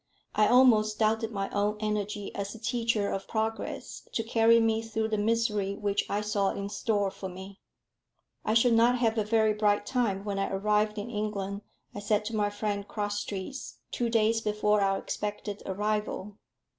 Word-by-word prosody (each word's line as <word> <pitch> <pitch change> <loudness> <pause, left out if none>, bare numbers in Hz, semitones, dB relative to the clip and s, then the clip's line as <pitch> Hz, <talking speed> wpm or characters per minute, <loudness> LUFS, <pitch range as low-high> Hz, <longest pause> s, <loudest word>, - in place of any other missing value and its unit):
I 210 0 +4
almost 220 -4 +5
doubted 220 +1 +1
my 195 -2 -2
own 205 +1 0
energy 210 -1 -2
as 200 +2 -4
a - - -10
teacher 230 -3 0
of 195 - -4
progress 220 0 -3
to 225 - 0
carry 230 0 +4
me 225 -1 +2
through 220 -1 -2
the 215 - 0
misery 210 -2 +1
which 205 -1 -1
I 205 - 0
saw 210 -2 +1
in 200 0 -4
store 205 -1 0
for 195 -1 -7
me. 190 +2 -10 0.8
"I 215 - +1
shall 235 +1 +5
not 235 +2 +5
have 225 -2 +1
a - - +2
very 220 0 +3
bright 205 -1 +2
time 220 -7 0
when 200 -1 -2
I 195 - 0
arrive 210 +2 +1
in 210 +3 -4
England," 205 -2 -3 0.3
I - - -5
said 210 +1 0
to 225 +1 -3
my 205 -1 +1
friend 205 -1 -3
Crosstrees, 205 +3 -4
two 240 -1 -1
days 225 0 +2
before 210 -1 +1
our 195 0 +2
expected 205 0 -4
arrival. 210 0 -2
210 Hz, 175 wpm, -29 LUFS, 205-225 Hz, 0.8 s, almost